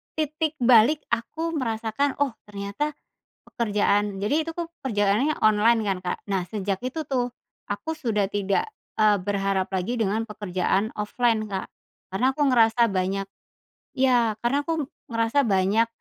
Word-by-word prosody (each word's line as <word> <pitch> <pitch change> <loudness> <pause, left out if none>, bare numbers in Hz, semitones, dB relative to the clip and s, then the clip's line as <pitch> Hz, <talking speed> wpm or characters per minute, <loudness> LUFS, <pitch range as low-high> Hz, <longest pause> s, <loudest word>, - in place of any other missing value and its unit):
titik 310 0 -1
balik 250 +5 +5
aku 310 +8 -2
merasakan, 230 +4 -1
"Oh 275 - -2 0.2
ternyata 205 +9 -3 0.5
pekerjaan" 205 -3 +1
jadi 250 +8 +1
itu 330 - -5
tuh 335 0 -4 0.2
kerjaannya 220 +4 +1
online 215 +2 +4
kan, 195 -2 +1
Kak. 180 - -2
Nah, 195 -2 0
sejak 195 -2 -3
itu 280 +4 -4
tuh, 245 -2 0 0.4
aku 320 +10 -3
sudah 220 -9 0
tidak, 200 - 0 0.3
eee, 210 -1 +5
berharap 195 -1 0
lagi 190 +6 -1
dengan 220 +1 0
pekerjaan 200 +1 -1
offline, 220 0 +1
Kak. 195 -2 -5 0.4
Karena 195 +7 0
aku 300 - -3
ngerasa 230 -2 +4
banyak 195 +1 -1 0.7
ya 245 -4 +3
karena 240 +4 +1
aku 320 -4 -2 0.2
ngerasa 230 +5 +2
banyak, 200 +2 +3
225 Hz, 140 wpm, -25 LUFS, 200-260 Hz, 0.7 s, balik